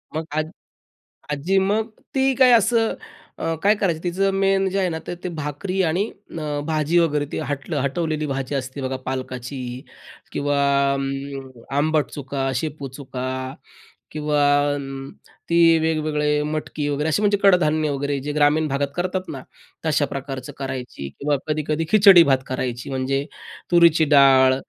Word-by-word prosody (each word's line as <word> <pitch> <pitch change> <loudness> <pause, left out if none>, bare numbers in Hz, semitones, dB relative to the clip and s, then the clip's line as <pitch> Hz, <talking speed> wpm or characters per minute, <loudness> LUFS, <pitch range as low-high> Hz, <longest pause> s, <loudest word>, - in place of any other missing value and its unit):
मग 160 +1 -2
आज 155 0 -1 0.8
आज्जी 160 +7 0
मग 205 +3 +1 0.3
ती 265 0 +2
काय 255 -1 +6
असं 230 0 +3 0.4
अ, 165 0 -1
काय 205 +2 +5
करायचं 170 -5 0
तिचं 195 +3 +1
मेन 195 0 +2
जे 195 - -2
आहे 190 -2 +1
ना 160 -2 -3
ते - - -4
ते - - -1
भाकरी 155 +6 -3
आणि 180 +6 +1 0.3
अ, 150 -2 -3
भाजी 155 +2 +1
वगैरे 150 -3 +2
ती - - -2
हटलं 140 -2 -3
हटवलेली 155 +2 -1
भाजी 135 0 -3
असते 130 +1 -4
बघा, 130 0 -2
पालकाची 130 0 -4 0.7
किंवा 145 0 0 0.4
अं, 135 0 -4 0.3
आंबट 155 +1 +2
चुका, 135 -1 -3
शेपू 150 -3 -5
चुका 130 -2 -5 0.8
किंवा 150 -1 -1 0.3
अं, 135 -1 -6 0.4
ती 165 -1 +5
वेगवेगळे 150 -2 0
मटकी 150 -1 -3
वगैरे 145 +2 -1
असे 180 +7 +1
म्हणजे 205 -1 +3
कडधान्य 155 -5 +3
वगैरे, 140 0 -2
जे 145 +2 -4
ग्रामीण 150 +1 +3
भागात 140 +1 -1
करतात 185 +1 -2
ना, 135 -4 -6 0.4
तशा 150 -2 +2
प्रकारचं 135 -1 -6
करायची 130 - -5
किंवा 145 0 +1
कधी-कधी 155 +1 -1
खिचडी 195 -4 +8
भात 135 -2 +4
करायची, 125 -1 -4
म्हणजे 135 +1 -1 0.5
तुरीची 170 -2 +5
डाळ 130 -1 +6
150 Hz, 150 wpm, -22 LUFS, 140-170 Hz, 0.8 s, खिचडी